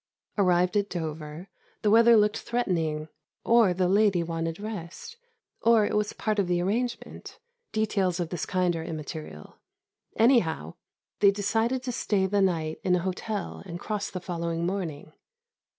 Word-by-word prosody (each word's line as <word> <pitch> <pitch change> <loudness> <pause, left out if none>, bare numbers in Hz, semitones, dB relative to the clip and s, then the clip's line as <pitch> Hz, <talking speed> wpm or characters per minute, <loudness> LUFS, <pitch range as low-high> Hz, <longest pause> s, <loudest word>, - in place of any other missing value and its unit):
Arrived 180 -2 +2
at 205 0 +1
Dover, 160 0 -5 0.4
the 210 - +3
weather 230 +1 +7
looked 210 0 +2
threatening, 165 -10 -1 0.4
or 230 -4 +5
the 180 0 +1
lady 195 -2 +3
wanted 165 0 -3
rest, 205 - -7 0.5
or 230 -2 +5
it - - -2
was 210 0 +1
part 215 -1 -1
of 195 - +1
the 175 -1 +1
arrangement 235 +7 -3 0.3
details 195 -5 0
of 170 -2 -2
this 175 -2 -4
kind 180 -2 +1
are 165 - -4
immaterial 155 - -7 0.6
anyhow, 185 - +2 0.5
they 200 - +6
decided 225 +5 0
to 255 - -2
stay 205 -4 0
the 200 +1 +1
night 160 -4 0
in 180 -1 +3
an 180 - 0
hotel 190 +3 -4
and 175 -1 -6
cross 210 0 -3
the 185 - -5
following 170 -1 -3
morning. 170 -6 -4
185 Hz, 150 wpm, -27 LUFS, 170-210 Hz, 0.6 s, weather